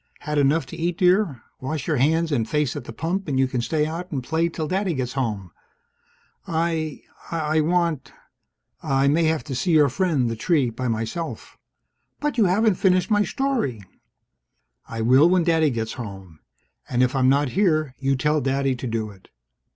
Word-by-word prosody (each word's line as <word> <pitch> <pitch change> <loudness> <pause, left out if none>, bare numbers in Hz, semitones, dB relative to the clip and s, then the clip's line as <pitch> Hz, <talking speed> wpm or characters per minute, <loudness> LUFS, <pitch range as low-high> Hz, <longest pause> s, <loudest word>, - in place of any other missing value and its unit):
"Had 150 -1 -1
enough 145 +4 +2
to - - -9
eat, 170 +1 -2
dear? 180 - +2 0.2
Wash 140 +3 -4
your 155 -3 0
hands 160 +5 +2
and 115 -6 0
face 150 -4 0
at 145 -5 -6
the - - -7
pump, 170 +9 -3
and 140 -3 -1
you 135 - +3
can 130 -2 -2
stay 150 +6 0
out 170 +4 -5
and 135 -5 -3
play 165 +5 0
till 160 -2 -4
Daddy 185 -1 -1
gets 125 -2 -3
home. 105 -9 -3 1.0
I 160 -2 -2 0.3
I 155 -1 0
want 165 -6 0 0.7
I 135 0 +1
may 160 +4 +3
have 160 -1 +1
to 145 - -6
see 170 +7 0
your 150 -2 +5
friend, 140 -3 +1
the 115 - -2
tree, 135 0 +1
by 125 +3 -4
myself 115 +9 -4 0.3
..." - - -51
"But 295 -4 -1
you 215 - +5
haven't 205 +2 +2
finished 185 +2 +3
my 205 0 +4
story!" 220 - -1 1.1
"I 115 0 -5
will 130 +8 +5
when 180 -1 +3
Daddy 160 -2 +3
gets 115 -3 -3
home. 95 -9 -9 0.5
And 125 0 +2
if 125 +2 0
I'm 130 -1 +3
not 140 0 +2
here, 155 -6 +1
you 135 0 +1
tell 150 +3 +1
Daddy 135 0 0
to 125 - -5
do 110 -2 -3
it." 95 -2 -19
150 Hz, 190 wpm, -23 LUFS, 125-170 Hz, 1.1 s, your